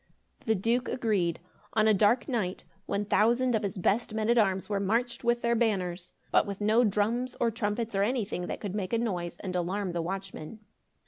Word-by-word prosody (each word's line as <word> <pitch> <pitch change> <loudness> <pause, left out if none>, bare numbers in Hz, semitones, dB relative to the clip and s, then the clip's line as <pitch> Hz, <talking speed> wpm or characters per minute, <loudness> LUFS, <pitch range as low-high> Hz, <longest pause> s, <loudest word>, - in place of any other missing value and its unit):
The 220 - +3
Duke 230 +6 0
agreed. 200 -9 0 0.3
On 215 0 +3
a 215 - +6
dark 210 +5 +3
night, 215 -9 -2 0.2
one 200 +1 -1
thousand 240 +5 +3
of 220 - +2
his 200 -2 -3
best 215 +5 0
men 220 +1 +1
at 240 - +3
arms 190 -3 +1
were 205 -1 -1
marched 230 +6 0
with 240 0 +1
their 235 0 +2
banners, 190 -6 -1 0.2
but - - +4
with 200 -1 -5
no 215 +3 +4
drums 225 +4 0
or 235 -1 +2
trumpets, 220 +1 -2
or 195 - +1
anything 205 -5 -1
that - - -4
could 200 -3 -5
make 200 0 -3
a - - +4
noise 180 -7 -2
and 185 -2 -4
alarm 185 +2 -1
the 170 -1 -2
watchmen. 190 +2 -6
210 Hz, 200 wpm, -29 LUFS, 190-235 Hz, 0.3 s, a